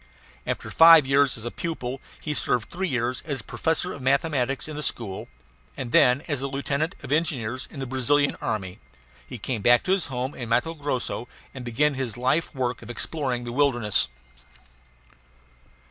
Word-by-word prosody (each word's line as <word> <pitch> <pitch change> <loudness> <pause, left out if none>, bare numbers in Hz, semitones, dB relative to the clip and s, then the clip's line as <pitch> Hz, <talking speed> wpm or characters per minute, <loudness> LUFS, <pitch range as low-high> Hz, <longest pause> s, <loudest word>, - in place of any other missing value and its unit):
After - - -3
five 165 -2 +8
years 140 0 +3
as 115 +1 -6
pupil 135 -6 -4 0.2
he 150 - -3
served 125 -5 0
three 190 +2 -2
years 125 -3 -1
as 140 -7 -3
professor 165 +2 -1
of 140 - -9
mathematics 135 0 +1
in 155 - -6
this 150 -3 0
school; 100 -5 -4 0.5
and 125 -3 -5
then, 125 +5 +5
as 145 -4 -1
a 140 - -1
lieutenant 140 +4 -2
of 130 - -7
engineers 130 -6 0
in 145 - -10
the 135 - -3
Brazilian 135 +3 +2
army, 95 -4 -3 0.5
he - - -7
came 115 +1 -3
back 120 +4 +5
to 185 - -1
his 190 -2 +2
home 130 +1 -3
in 120 -2 -6
Matto 160 +8 +1
Grosso 140 -5 -2 0.3
and 130 - -7
began 145 +5 +1
his 130 -5 -3
life 130 +7 +1
work 125 -2 -2
of - - -11
exploring 125 -1 -2
the 120 - -5
wilderness. 120 -7 +2
130 Hz, 170 wpm, -25 LUFS, 120-145 Hz, 0.5 s, five